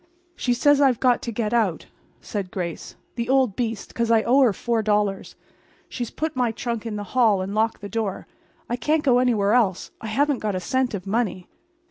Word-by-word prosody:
"She 245 -2 0
says 290 +3 +4
I've 260 -5 +3
got 250 -2 +3
to 235 - -4
get 220 0 -2
out," 210 -9 +1 0.4
said 200 -3 -4
Grace. 175 -3 -5 0.2
"The 235 0 -4
old 260 -6 +3
beast. 225 -4 -3
Because 235 -1 -2
I 225 -1 +4
owe 265 +4 +4
her 250 -4 +5
$4. 210 -3 -1 0.5
She's 240 -3 -4
put 315 -1 -4
my 250 -2 +1
trunk 235 0 -4
in 215 - -4
the 205 - -4
hall 225 -6 +4
and 195 +2 -5
locked 220 +1 0
the 205 - -6
door. 215 -3 -3 0.4
I 240 - -2
can't 305 +4 +1
go 250 -4 +4
anywhere 220 -5 +2
else. 210 -7 +1
I 225 - -6
haven't 280 +4 +1
got 210 -3 -2
a - - -1
cent 250 +6 -1
of 185 - -7
money." 200 -3 -1
230 Hz, 200 wpm, -23 LUFS, 205-250 Hz, 0.5 s, her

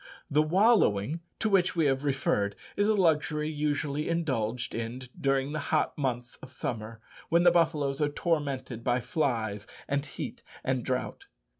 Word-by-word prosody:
The 150 +2 +5
wallowing, 160 - +3 0.2
to 220 - 0
which 185 -3 +3
we 165 -2 +2
have 135 0 +1
referred, 130 -8 0 0.2
is 205 - +2
a 215 - +4
luxury 155 -4 +2
usually 150 0 -1
indulged 125 -8 -1
in 115 +3 -4 0.2
during 135 0 +1
the 155 - -2
hot 155 - +1
months 125 -4 -2
of 130 - -12
summer, 115 -3 -5 0.3
when 170 +1 +4
the 175 - +7
buffaloes 155 -5 +1
are 150 - +3
tormented 140 -7 -2
by 120 +1 +2
flies, 115 -7 -1 0.2
and 140 0 0
heat, 145 - -6 0.2
and 130 -2 0
drought. 130 - -3
140 Hz, 155 wpm, -29 LUFS, 125-160 Hz, 0.3 s, the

